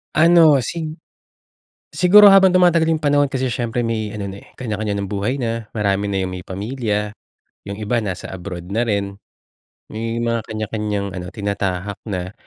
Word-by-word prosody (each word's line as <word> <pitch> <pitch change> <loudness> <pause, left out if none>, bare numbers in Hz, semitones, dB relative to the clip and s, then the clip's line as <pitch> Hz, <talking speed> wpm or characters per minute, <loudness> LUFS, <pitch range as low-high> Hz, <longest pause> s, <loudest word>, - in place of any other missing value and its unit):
Ano 160 -4 +6
sig 160 +2 -4 1.0
siguro 200 +3 +7
habang 190 -1 +6
tumatagal 175 -3 +4
yung 160 -1 0
panahon 145 -1 +3
kasi 130 -2 -2
siyempre 120 -1 -2
may 110 -2 -2
ano 105 -2 -4
na, 100 +1 -9
eh, - - -19
kanya-kanya 110 -4 -3
ng 100 -1 -3
buhay 105 +6 -1
na, 115 -3 -3
marami 100 -1 0
na 95 -1 -1
yung 95 - -4
may 90 -1 -6
pamilya, 105 +1 -3 0.5
yung 100 0 -5
iba 110 +3 0
nasa 95 -4 -5
abroad 90 -1 -7
na 115 - +1
rin, 100 -2 -2 0.7
may 115 +1 -3
mga 115 0 0
kanya-kanyang 105 -2 -3
ano, 90 -1 -6
tinatahak 100 -1 -3
na. 95 -1 -4
110 Hz, 165 wpm, -20 LUFS, 100-130 Hz, 1.0 s, siguro